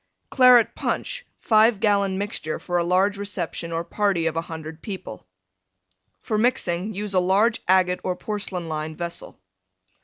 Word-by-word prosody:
CLARET 250 Hz, -3 st, +6 dB
PUNCH -, -, -3 dB
(5 220 Hz, -1 st, +3 dB
gallon 200 Hz, -2 st, +2 dB
mixture 195 Hz, -6 st, -3 dB
for 175 Hz, 0 st, -2 dB
a -, -, +1 dB
large 190 Hz, +3 st, +1 dB
reception 175 Hz, -4 st, -4 dB
or 165 Hz, 0 st, -2 dB
party 195 Hz, -3 st, 0 dB
of 165 Hz, -, 0 dB
100 160 Hz, -1 st, -6 dB
people) 185 Hz, -, -8 dB, 1.0 s
For 215 Hz, -2 st, -1 dB
mixing 210 Hz, -5 st, 0 dB
use 205 Hz, 0 st, -5 dB
a 185 Hz, -, +4 dB
large 200 Hz, +6 st, +2 dB
agate 180 Hz, -1 st, +3 dB
or 185 Hz, -, -1 dB
porcelain 190 Hz, -4 st, -4 dB
lined 155 Hz, 0 st, -4 dB
vessel. 170 Hz, -1 st, -6 dB
190 Hz, 145 wpm, -23 LUFS, 170-210 Hz, 1.0 s, CLARET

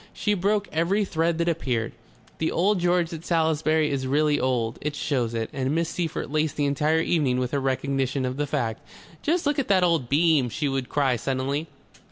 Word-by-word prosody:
She 210 Hz, -, 0 dB
broke 205 Hz, +2 st, 0 dB
every 185 Hz, +6 st, +1 dB
thread 165 Hz, -2 st, 0 dB
that 170 Hz, 0 st, 0 dB
appeared. 130 Hz, -9 st, -1 dB, 0.5 s
The 160 Hz, -, 0 dB
Old 195 Hz, +3 st, +2 dB
George 175 Hz, -1 st, +1 dB
at 165 Hz, 0 st, -7 dB
Salisbury 160 Hz, -2 st, +1 dB
is 135 Hz, -2 st, -2 dB
really 150 Hz, +2 st, +2 dB
old; 120 Hz, -3 st, -1 dB
it 150 Hz, 0 st, -3 dB
shows 125 Hz, -6 st, -1 dB
it, 115 Hz, -1 st, -1 dB
and 135 Hz, +2 st, -1 dB
Miss 165 Hz, 0 st, 0 dB
Seyffert 165 Hz, -5 st, -3 dB
laced 155 Hz, 0 st, 0 dB
the 145 Hz, -, 0 dB
entire 150 Hz, +3 st, +2 dB
evening 145 Hz, -7 st, +1 dB
with 125 Hz, -1 st, -1 dB
her 140 Hz, -, 0 dB
recognition 135 Hz, 0 st, -1 dB
of 130 Hz, +1 st, -3 dB
the 145 Hz, 0 st, -1 dB
fact. 120 Hz, -6 st, -2 dB, 0.4 s
"Just 335 Hz, +2 st, 0 dB
look 290 Hz, 0 st, +1 dB
at 265 Hz, -, -1 dB
that 190 Hz, -2 st, +3 dB
old 165 Hz, -8 st, +1 dB
beam!" 150 Hz, -3 st, +3 dB
she 150 Hz, +3 st, -2 dB
would 135 Hz, -2 st, -2 dB
cry 135 Hz, -4 st, +1 dB
suddenly. 135 Hz, +6 st, -2 dB
150 Hz, 200 wpm, -25 LUFS, 130-170 Hz, 0.5 s, that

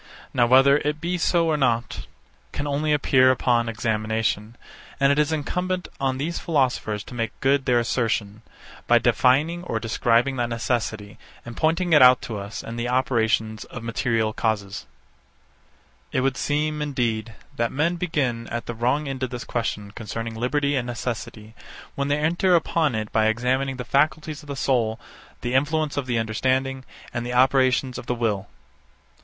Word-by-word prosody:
Now 120 Hz, -1 st, +3 dB
whether 135 Hz, +3 st, +6 dB
it 150 Hz, +1 st, -2 dB
be 175 Hz, +2 st, -2 dB
so 170 Hz, 0 st, +2 dB
or 155 Hz, -2 st, +1 dB
not, 120 Hz, -5 st, -1 dB, 0.4 s
can 145 Hz, -, -4 dB
only 145 Hz, +2 st, 0 dB
appear 130 Hz, -3 st, +4 dB
upon 120 Hz, -2 st, +2 dB
examination; 110 Hz, 0 st, -1 dB, 0.4 s
and 140 Hz, 0 st, +4 dB
it 140 Hz, -, +2 dB
is 150 Hz, +1 st, +2 dB
incumbent 180 Hz, +4 st, -2 dB
on 135 Hz, -1 st, 0 dB
these 160 Hz, +5 st, -3 dB
philosophers 125 Hz, -9 st, 0 dB
to -, -, -12 dB
make 115 Hz, -2 st, -4 dB
good 135 Hz, 0 st, +2 dB
their 125 Hz, -1 st, +3 dB
assertion, 110 Hz, -3 st, -1 dB, 0.5 s
by -, -, +6 dB
defining 155 Hz, +7 st, +2 dB
or 115 Hz, -10 st, -2 dB
describing 120 Hz, +3 st, +1 dB
that 120 Hz, -1 st, -1 dB
necessity, 115 Hz, -3 st, -3 dB, 0.3 s
and 120 Hz, -1 st, -8 dB
pointing 165 Hz, +2 st, +1 dB
it 150 Hz, -, +7 dB
out 125 Hz, 0 st, +8 dB
to 110 Hz, -3 st, -5 dB
us 100 Hz, +2 st, -7 dB
in 115 Hz, -, -7 dB
the 120 Hz, +1 st, -2 dB
operations 110 Hz, -3 st, 0 dB
of 125 Hz, -, -9 dB
material 115 Hz, -1 st, 0 dB
causes. 105 Hz, -4 st, -2 dB, 1.3 s
72. -, -, 0 dB
It -, -, +3 dB
would 135 Hz, 0 st, 0 dB
seem, 150 Hz, +1 st, -1 dB
indeed, 115 Hz, -6 st, -2 dB, 0.2 s
that 115 Hz, 0 st, 0 dB
men 170 Hz, +5 st, 0 dB
begin 135 Hz, -10 st, -1 dB
at 120 Hz, 0 st, -4 dB
the 120 Hz, -, -4 dB
wrong 125 Hz, +6 st, 0 dB
end 135 Hz, -1 st, -5 dB
of 130 Hz, -, -1 dB
this 125 Hz, 0 st, -6 dB
question 105 Hz, -4 st, -3 dB
concerning 115 Hz, +1 st, -5 dB
liberty 140 Hz, +5 st, 0 dB
and 125 Hz, -2 st, -1 dB
necessity, 115 Hz, -3 st, -5 dB, 0.4 s
when 140 Hz, 0 st, -2 dB
they 145 Hz, +1 st, +1 dB
enter 175 Hz, +4 st, +2 dB
upon 160 Hz, -5 st, +1 dB
it 110 Hz, -1 st, -3 dB
by 110 Hz, -1 st, +3 dB
examining 130 Hz, +4 st, 0 dB
the 125 Hz, -, -5 dB
faculties 150 Hz, +3 st, 0 dB
of 150 Hz, -, -16 dB
the 140 Hz, -, -5 dB
soul, 120 Hz, -5 st, 0 dB, 0.4 s
the 120 Hz, +1 st, -3 dB
influence 150 Hz, +3 st, +1 dB
of 140 Hz, -3 st, -2 dB
the 120 Hz, -2 st, 0 dB
understanding, 130 Hz, +4 st, -1 dB, 0.3 s
and 120 Hz, -1 st, -2 dB
the 120 Hz, 0 st, -4 dB
operations 130 Hz, 0 st, +3 dB
of 120 Hz, -, -11 dB
the 125 Hz, -, 0 dB
will. 105 Hz, -4 st, -1 dB
125 Hz, 170 wpm, -24 LUFS, 115-145 Hz, 1.3 s, out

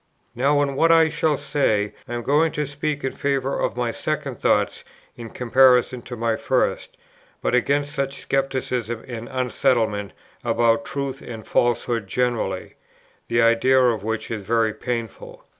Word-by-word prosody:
Now 140 Hz, +4 st, +2 dB
in 140 Hz, -1 st, -2 dB
what 165 Hz, +4 st, +4 dB
I 165 Hz, -1 st, +6 dB
shall 155 Hz, -1 st, +1 dB
say, 105 Hz, -9 st, 0 dB
I 120 Hz, -, -6 dB
am 120 Hz, -, -2 dB
not -, -, -14 dB
going 155 Hz, +3 st, +3 dB
to 150 Hz, -, -1 dB
speak 145 Hz, +1 st, -3 dB
in 135 Hz, -, -1 dB
favour 135 Hz, -1 st, -1 dB
of -, -, -1 dB
my 120 Hz, -1 st, 0 dB
second -, -, -3 dB
thoughts -, -, +1 dB, 0.3 s
in 115 Hz, -1 st, -8 dB
comparison 125 Hz, 0 st, +3 dB
of 120 Hz, -, -6 dB
my 115 Hz, 0 st, 0 dB
first, -, -, -1 dB, 0.4 s
but -, -, -1 dB
against 145 Hz, +4 st, +1 dB
such 140 Hz, -1 st, -3 dB
scepticism 130 Hz, -4 st, -1 dB
and 120 Hz, -1 st, -7 dB
unsettlement 115 Hz, -5 st, 0 dB, 0.3 s
about 115 Hz, -1 st, +2 dB
truth 140 Hz, -1 st, -4 dB
and 110 Hz, -2 st, -8 dB
falsehood 120 Hz, -3 st, 0 dB
generally, 115 Hz, -4 st, -1 dB, 0.5 s
the 115 Hz, 0 st, +2 dB
idea 115 Hz, +3 st, +4 dB
of 120 Hz, -5 st, +2 dB
which 110 Hz, +1 st, -3 dB
is 110 Hz, -3 st, -4 dB
very 115 Hz, +1 st, +1 dB
painful. 115 Hz, -3 st, -6 dB
125 Hz, 160 wpm, -23 LUFS, 115-135 Hz, 0.5 s, I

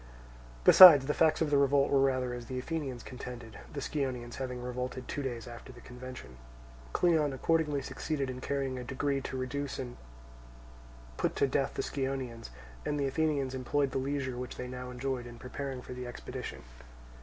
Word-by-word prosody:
Besides 160 Hz, -, +11 dB
the 150 Hz, -, 0 dB
facts 160 Hz, +1 st, +3 dB
of 155 Hz, -2 st, +1 dB
the 140 Hz, -, +5 dB
revolt 140 Hz, 0 st, +3 dB
were 140 Hz, -1 st, +5 dB
rather 130 Hz, -2 st, +1 dB
as 120 Hz, -1 st, -7 dB
the 130 Hz, -, -4 dB
Athenians 135 Hz, -3 st, -4 dB
contended, 120 Hz, -3 st, -8 dB
the 140 Hz, -, -5 dB
Scionaeans 130 Hz, -5 st, -3 dB
having 125 Hz, -2 st, -4 dB
revolted 125 Hz, +1 st, -4 dB
two 145 Hz, -, -3 dB
days 120 Hz, -4 st, -4 dB
after 120 Hz, +2 st, -10 dB
the 120 Hz, -, -13 dB
convention. 125 Hz, -, -10 dB, 0.5 s
Cleon 155 Hz, -, +3 dB
accordingly 150 Hz, 0 st, +1 dB
succeeded 145 Hz, -4 st, -3 dB
in 130 Hz, 0 st, -6 dB
carrying 135 Hz, -2 st, -2 dB
a -, -, -5 dB
decree 135 Hz, +2 st, -1 dB
to 130 Hz, -, -5 dB
reduce 140 Hz, +2 st, -3 dB
and 125 Hz, -2 st, -6 dB, 1.2 s
put -, -, 0 dB
to -, -, +3 dB
death 135 Hz, 0 st, 0 dB
the -, -, -1 dB
Scionaeans; 130 Hz, -4 st, -3 dB, 0.3 s
and 145 Hz, -, -1 dB
the 140 Hz, -, +1 dB
Athenians 140 Hz, -1 st, 0 dB
employed 135 Hz, +2 st, 0 dB
the 135 Hz, -, -1 dB
leisure 130 Hz, -2 st, -2 dB
which 125 Hz, -, -5 dB
they 125 Hz, -, -5 dB
now 125 Hz, 0 st, -6 dB
enjoyed 125 Hz, 0 st, -3 dB
in 120 Hz, 0 st, -10 dB
preparing 130 Hz, +1 st, -5 dB
for -, -, -8 dB
the 125 Hz, 0 st, -6 dB
expedition. 120 Hz, -, -7 dB
130 Hz, 180 wpm, -31 LUFS, 125-140 Hz, 1.2 s, Besides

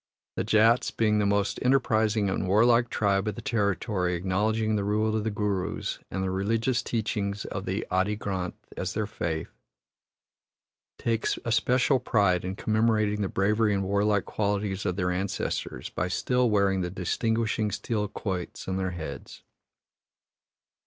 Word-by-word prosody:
The -, -, -1 dB
Jats, 115 Hz, +3 st, +4 dB
being 105 Hz, -2 st, +1 dB
the 105 Hz, -, +2 dB
most 100 Hz, 0 st, +1 dB
enterprising 110 Hz, -5 st, +2 dB
and 95 Hz, 0 st, -1 dB
warlike 115 Hz, +4 st, +4 dB
tribe 100 Hz, -1 st, +1 dB
of 105 Hz, -, -2 dB
the -, -, -7 dB
territory 100 Hz, -4 st, 0 dB
acknowledging 105 Hz, +5 st, 0 dB
the 100 Hz, -, 0 dB
rule 110 Hz, +2 st, +1 dB
of 110 Hz, -, 0 dB
the 110 Hz, -, 0 dB
Gurus 100 Hz, -3 st, -2 dB
and 95 Hz, +1 st, -2 dB
the 95 Hz, -, -1 dB
religious 115 Hz, +6 st, 0 dB
teachings 105 Hz, -3 st, -2 dB
of 95 Hz, 0 st, -5 dB
the 95 Hz, +4 st, -2 dB
Adi 95 Hz, +3 st, +1 dB
Granth 95 Hz, -4 st, -3 dB, 0.2 s
as 90 Hz, 0 st, -3 dB
their 110 Hz, 0 st, 0 dB
faith, 80 Hz, -6 st, -3 dB, 1.5 s
take 115 Hz, -1 st, -1 dB, 0.2 s
especial 125 Hz, +3 st, +2 dB
pride 100 Hz, -7 st, +2 dB
in 95 Hz, +1 st, -3 dB
commemorating 110 Hz, -1 st, +1 dB
the 100 Hz, -, -1 dB
bravery 105 Hz, +2 st, +2 dB
and 95 Hz, -, 0 dB
warlike 100 Hz, +1 st, +1 dB
qualities 100 Hz, -2 st, -1 dB
of 90 Hz, -, 0 dB
their 90 Hz, -1 st, 0 dB
ancestors 95 Hz, +2 st, -3 dB
by 90 Hz, -, -1 dB
still 125 Hz, +6 st, +1 dB
wearing 100 Hz, -2 st, +2 dB
the 90 Hz, -, -2 dB
distinguishing 110 Hz, +4 st, 0 dB
steel 105 Hz, 0 st, -2 dB
quoits 95 Hz, -3 st, -5 dB
on 95 Hz, 0 st, -1 dB
their 95 Hz, -1 st, -1 dB
heads. 75 Hz, -4 st, -8 dB
105 Hz, 150 wpm, -27 LUFS, 95-110 Hz, 1.5 s, Jats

